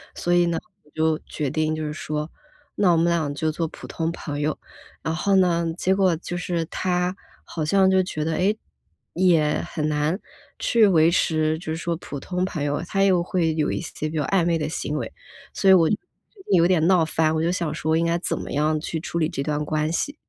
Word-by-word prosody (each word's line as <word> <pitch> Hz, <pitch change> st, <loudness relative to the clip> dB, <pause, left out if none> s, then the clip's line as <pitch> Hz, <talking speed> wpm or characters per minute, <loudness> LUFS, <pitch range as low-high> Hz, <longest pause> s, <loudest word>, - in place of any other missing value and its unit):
所 175 Hz, -, 0 dB
以 175 Hz, 0 st, +4 dB
呢 170 Hz, -1 st, 0 dB, 0.3 s
我 150 Hz, -, -25 dB
就 160 Hz, 0 st, +1 dB
决 145 Hz, -4 st, -3 dB
定 155 Hz, +1 st, 0 dB
就 155 Hz, -, -4 dB
是 150 Hz, -, -3 dB
说 150 Hz, +1 st, -4 dB, 0.5 s
那 190 Hz, -4 st, +3 dB
我 170 Hz, -, +4 dB
们 165 Hz, -, +3 dB
俩 165 Hz, -4 st, +1 dB
就 155 Hz, +1 st, 0 dB
做 165 Hz, +1 st, -2 dB
普 -, -, -11 dB
通 165 Hz, 0 st, -2 dB
朋 145 Hz, -3 st, -5 dB
友。 150 Hz, +1 st, -1 dB, 0.5 s
然 160 Hz, +1 st, -1 dB
后 200 Hz, +3 st, +1 dB
呢， 170 Hz, -3 st, +3 dB
结 190 Hz, +1 st, +2 dB
果 190 Hz, -4 st, +3 dB
就 175 Hz, +2 st, -6 dB
是 170 Hz, -2 st, -2 dB
他 180 Hz, +1 st, -1 dB, 0.3 s
好 160 Hz, -, -4 dB
像 190 Hz, +4 st, +4 dB
就 190 Hz, 0 st, +4 dB
觉 155 Hz, -4 st, -3 dB
得， 160 Hz, -, 0 dB
哎， 195 Hz, +5 st, +2 dB, 0.6 s
也 165 Hz, -4 st, +3 dB
很 155 Hz, -1 st, -2 dB
难 150 Hz, +5 st, 0 dB, 0.4 s
去 225 Hz, -3 st, +4 dB
维 165 Hz, -3 st, +4 dB
持 155 Hz, -2 st, +1 dB
就 -, -, -12 dB
是 160 Hz, 0 st, -2 dB
说 170 Hz, 0 st, -2 dB
普 145 Hz, -4 st, -7 dB
通 180 Hz, +4 st, -3 dB
朋 155 Hz, -6 st, -4 dB
友， 145 Hz, +2 st, -1 dB
他 195 Hz, 0 st, +1 dB
又 185 Hz, -3 st, +4 dB
会 170 Hz, -2 st, 0 dB
有 155 Hz, -1 st, 0 dB
一 -, -, -2 dB
些 155 Hz, -2 st, -5 dB
比 160 Hz, -, -7 dB
较 150 Hz, -, +1 dB
暧 190 Hz, -3 st, +2 dB
昧 170 Hz, -1 st, +2 dB
的 150 Hz, -1 st, -2 dB
行 150 Hz, -1 st, -3 dB
为。 -, -, -5 dB, 0.4 s
所 195 Hz, -, +2 dB
以 -, -, +9 dB
我 165 Hz, -3 st, +6 dB
就 210 Hz, -, +2 dB, 0.6 s
有 170 Hz, -2 st, +5 dB
点 175 Hz, -3 st, +3 dB
闹 185 Hz, -3 st, +5 dB
翻， 160 Hz, 0 st, +1 dB
我 160 Hz, -, 0 dB
就 165 Hz, -, +1 dB
在 -, -, +1 dB
想， 170 Hz, -4 st, -2 dB, 0.2 s
应 165 Hz, -, +1 dB
该 170 Hz, 0 st, +1 dB
怎 -, -, -2 dB
么 -, -, -6 dB
样 155 Hz, +2 st, +1 dB
去 160 Hz, 0 st, -3 dB
处 170 Hz, -, -5 dB
理 155 Hz, -, +2 dB
这 135 Hz, -, -4 dB
段 150 Hz, 0 st, -1 dB
关 155 Hz, 0 st, 0 dB
系？ 285 Hz, -, -2 dB
165 Hz, 250 characters per minute, -23 LUFS, 155-180 Hz, 0.6 s, 以